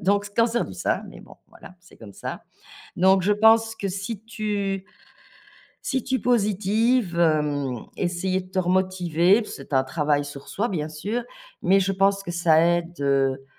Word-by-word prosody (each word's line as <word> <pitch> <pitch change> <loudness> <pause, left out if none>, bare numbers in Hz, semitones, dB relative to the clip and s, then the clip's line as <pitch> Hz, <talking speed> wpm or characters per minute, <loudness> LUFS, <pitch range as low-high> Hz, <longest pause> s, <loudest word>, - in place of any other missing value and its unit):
donc 200 +2 +1
cancer 230 +1 +2
du - - -9
sein, - - -1
mais - - -12
bon, - - -15
voilà, 180 - -15
c'est 180 - -19
comme 105 -3 -12
ça, - - -7 0.5
donc 190 +1 +4
je 200 +4 +1
pense 225 +1 +4
que 200 - -4
si 195 +3 -5
tu 205 -3 -3 1.0
si 265 -2 -1
tu 260 +1 -1
positives, 215 -2 +1
hem, 145 -6 0
essayer 185 +1 -1
de 185 0 -14
te 190 - -3
remotiver, 185 +1 +2
c'est - - -10
un 130 -1 +3
travail 145 0 0
sur 145 -1 -10
soi, 225 +4 -2
bien 155 -7 -3
sûr, 205 +10 -3 0.4
mais 195 +2 +4
je 195 +1 0
pense 195 +1 +2
que 175 - -6
ça 170 -2 +4
aide, 170 -1 0
heu, 135 -1 +1
185 Hz, 170 wpm, -24 LUFS, 160-210 Hz, 1.0 s, donc